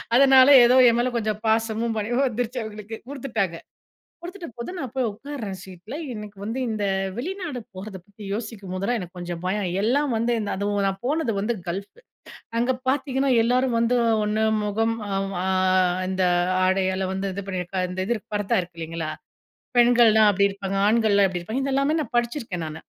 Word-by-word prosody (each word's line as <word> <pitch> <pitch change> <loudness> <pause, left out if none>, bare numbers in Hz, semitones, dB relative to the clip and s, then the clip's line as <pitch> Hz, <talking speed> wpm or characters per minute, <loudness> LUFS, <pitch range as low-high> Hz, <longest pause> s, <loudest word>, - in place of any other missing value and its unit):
அதனால 265 0 +7 0.2
ஏதோ 245 +2 +5
என் 230 - +2
மேல 255 - +1
கொஞ்சம் 215 -1 -2
பாசமும் 225 +1 +1
பணிவும் 240 +6 0
வந்துருச்சு 245 +1 -3
அவுங்களுக்கு 215 0 -7
குடுத்துட்டாங்க. 225 -11 -2 0.6
குடுத்துட்ட 350 0 -8
போது 235 +8 -5
நான் 265 -8 -5
போய் 255 -2 +1
உட்காருறேன் 215 -4 -7
சீட்ல. 190 +7 -10 0.2
எனக்கு 210 -2 -9
வந்து 225 +5 -3
இந்த 210 -2 -2 0.3
வெளிநாடு 345 -2 -4 0.2
போறத 195 +1 -8
பத்தி 205 +1 -14
யோசிக்கும்போதெல்லாம் 205 0 -3
எனக்கு 180 0 -9
கொஞ்சம் 175 -1 -5
பயம். 195 0 -1
எல்லாம் 275 +6 +1
வந்து 230 +2 0
இந்த 210 -2 -3
அதுவும் 205 0 0
நான் 195 0 -2
போனது 285 -5 0
வந்து 215 +4 0 0.2
கல்ஃப் 200 - -6 0.6
அங்க 245 +2 +2 0.2
பார்த்தீங்கன்னா 270 0 +1
எல்லோரும் 250 0 +1
வந்து 235 +2 +2 0.3
ஒண்ணு 215 +1 0 0.2
முகம் 225 +2 0 1.1
இந்த 190 0 0 0.3
அ - - +1
ஆடையால 190 0 +1
வந்து 190 0 -2
இது 200 0 -5
பண்ணியிருக்கா 185 0 -3
இந்த 185 +1 -4
இது 235 +2 0 0.2
பரத்தா 205 +1 +1
இருக்கு 175 -1 -13
இல்லைங்களா? 165 -1 -4 0.7
பெண்கள்லாம் 235 -3 +6
அப்டி 200 0 +3
இருப்பாங்க, 195 0 -4
"ஆண்கள்லாம் 210 -3 +4
எப்டி 180 -1 -4
இருப்பாங்க?" 235 +9 -3
இத 275 - -1
எல்லாமே 275 +3 +2
நான் 255 -4 -7
படிச்சிருக்கேன் 235 - -2
நானு. 155 +1 -8
220 Hz, 160 wpm, -24 LUFS, 195-245 Hz, 1.1 s, அதனால